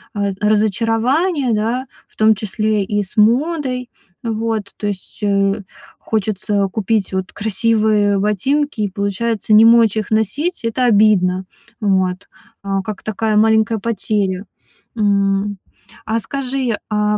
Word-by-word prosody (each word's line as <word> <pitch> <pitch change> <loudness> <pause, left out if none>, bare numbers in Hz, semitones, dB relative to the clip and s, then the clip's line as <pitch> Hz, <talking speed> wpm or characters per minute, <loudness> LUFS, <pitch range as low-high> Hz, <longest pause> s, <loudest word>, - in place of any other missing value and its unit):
э, 200 -1 0
разочарование, 230 - +1
да, 230 +5 -1 0.2
в - - -32
том 220 0 +4
числе 215 0 -1
и 205 +1 -1
с 190 - -9
модой. 250 +2 +1 0.3
А 230 - -2
вот, 220 -1 -2
то 210 - -3
есть, 195 -3 -6
э, 200 0 +1 0.4
хочется 205 -1 -1
купить 215 -1 -1
вот 190 -1 -3
красивые 215 -1 +1
ботинки 220 +6 0
и, 205 - 0
получается, 205 +2 -1
не 215 +1 +8
мочь 230 -2 +5
их 215 -1 -3
носить. 235 - -1
Это 240 +3 0
обидно, 200 -5 +3 0.4
вот, 190 -2 0 0.4
а, 195 -1 -1
как 210 0 -7
такая 215 0 -1
маленькая 220 0 +3
потеря, 200 -3 -2 0.5
м. 200 -1 +1 0.5
А 225 +1 0
скажи, 260 -1 -2
а 210 0 +1
215 Hz, 130 wpm, -18 LUFS, 200-230 Hz, 0.5 s, не